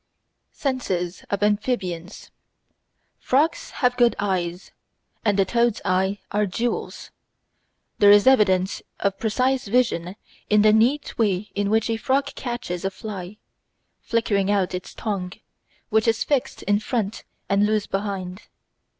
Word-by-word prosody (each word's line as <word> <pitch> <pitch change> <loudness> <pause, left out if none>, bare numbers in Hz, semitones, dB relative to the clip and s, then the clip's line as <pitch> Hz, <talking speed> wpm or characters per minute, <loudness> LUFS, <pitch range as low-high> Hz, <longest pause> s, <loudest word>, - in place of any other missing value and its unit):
Senses 190 - -2
of 200 0 -1
Amphibians 205 -4 -2 0.9
Frogs 320 - +1 0.2
have 245 0 +3
good 240 -1 +4
eyes, 180 -3 -2 0.5
and 205 -3 +2
the 195 - +4
toad's 235 +1 +1
eyes 190 +1 +1
are 210 0 +1
"jewels." 235 +6 -3 0.9
There 205 - +7
is 205 0 +7
evidence 195 -7 +3 0.2
of 200 -1 -1
precise 255 +3 0
vision 200 -6 +1 0.3
in 210 0 +5
the 215 0 +6
neat 245 +5 +1
way 205 -2 0
in 200 0 -1
which 220 +1 +2
a 225 -1 -1
frog 270 +4 0
catches 240 -8 -5
a 195 - 0
fly, 195 -1 -8 0.6
flicking 205 -4 0
out 195 -3 +1
its 180 0 -6
tongue, 190 -5 -3 0.6
which 220 0 +2
is 225 +1 +2
fixed 280 -4 -1
in 205 0 +2
front 220 -2 -3 0.2
and 200 +1 +3
loose 215 -1 +1
behind. 195 -1 -4
210 Hz, 135 wpm, -23 LUFS, 190-235 Hz, 0.9 s, There